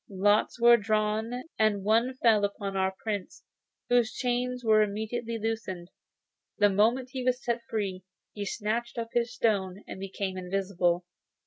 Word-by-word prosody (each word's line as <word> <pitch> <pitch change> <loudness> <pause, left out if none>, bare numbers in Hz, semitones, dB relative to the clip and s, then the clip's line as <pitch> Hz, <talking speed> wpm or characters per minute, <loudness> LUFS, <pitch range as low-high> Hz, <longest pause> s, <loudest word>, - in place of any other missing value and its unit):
Lots 205 +4 +2
were 235 0 +7
drawn, 215 +3 -1 0.2
and 215 -3 +2
one 230 +5 +2
fell 220 -3 +5
upon 200 -1 -2
our 190 0 +1
Prince, 205 -4 -4 0.4
whose 245 -1 +3
chains 250 0 -2
were 215 -1 +5
immediately 220 +3 -2
loosened. 210 -6 -4 0.7
The 205 -1 +5
moment 235 +6 +2
he 260 -1 -4
was 250 0 0
set 235 0 0
free, 195 -4 -2 0.3
he 205 - -4
snatched 230 +4 -2
up 230 -1 -3
his 240 0 +1
stone, 200 -5 0
and - - -8
became 190 0 -4
invisible. 180 -2 0
215 Hz, 145 wpm, -28 LUFS, 195-235 Hz, 0.7 s, were